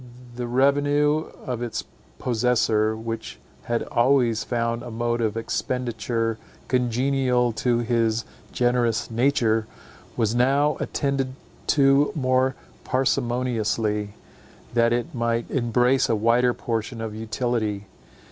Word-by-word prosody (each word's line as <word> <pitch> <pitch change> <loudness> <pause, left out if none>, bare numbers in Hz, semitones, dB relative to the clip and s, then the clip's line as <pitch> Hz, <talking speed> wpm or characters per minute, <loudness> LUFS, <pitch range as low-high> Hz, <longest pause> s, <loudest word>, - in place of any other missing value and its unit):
The 120 0 -4
revenue 145 +4 +2 0.2
of 125 -2 -3
its 120 -1 -3 0.3
possessor, 110 -3 +1
which 115 0 -5 0.3
had 120 0 -1
always 120 -2 +2
found 115 -1 -1
a 120 - -7
mode 120 +1 -1
of 110 -1 0
expenditure 115 -1 -2 0.3
congenial 125 0 +1
to 120 +1 0
his 115 -1 +1 0.3
generous 120 -2 +1
nature, 115 -3 +2 0.5
was 110 -1 +1
now 135 +5 +3
attended 135 -2 -1 0.3
to 140 0 +4
more 130 -2 +2 0.3
parsimoniously, 120 -5 0 0.6
that 115 0 +3
it 120 0 -1
might 115 -1 -1
embrace 125 +1 +2
a 115 - +3
wider 120 +3 +3
portion 115 0 -3
of 110 -1 -4
utility. 110 -2 -2
120 Hz, 110 wpm, -24 LUFS, 115-130 Hz, 0.6 s, to